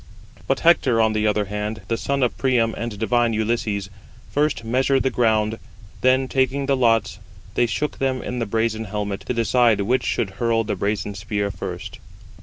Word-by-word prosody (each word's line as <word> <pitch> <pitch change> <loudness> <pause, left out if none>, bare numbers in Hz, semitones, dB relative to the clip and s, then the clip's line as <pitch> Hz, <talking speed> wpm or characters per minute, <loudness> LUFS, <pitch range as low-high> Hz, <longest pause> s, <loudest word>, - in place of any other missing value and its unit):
But 135 - 0
Hector 135 -8 +4
on 110 -1 +3
the 110 0 +1
other 105 -1 +1
hand, 105 +2 -4
the 115 - 0
son 140 +3 -1
of 125 - +1
Priam, 120 -4 +1
and 115 -3 -5
divine 115 +2 +1
Ulysses, 105 -3 -1 0.4
first 145 -4 0
measured 130 +3 +1
the 130 - +1
ground; 110 -2 +1 0.4
then 130 +1 +3
taking 130 +1 0
the 140 0 +2
lots, 115 -5 +2 0.3
they 120 - +2
shook 150 +5 -3
them 130 -1 0
in 125 0 -4
the 115 - -2
brazen 110 +1 -1
helmet, 105 -1 -3
[to - - 0
decide] 115 -1 +3
which 125 +6 +1
should 100 - -1
hurl 115 +2 0
the 105 - -2
brazen 105 0 -2
spear 100 +1 -2
first. - - -7
115 Hz, 180 wpm, -22 LUFS, 105-130 Hz, 0.4 s, Hector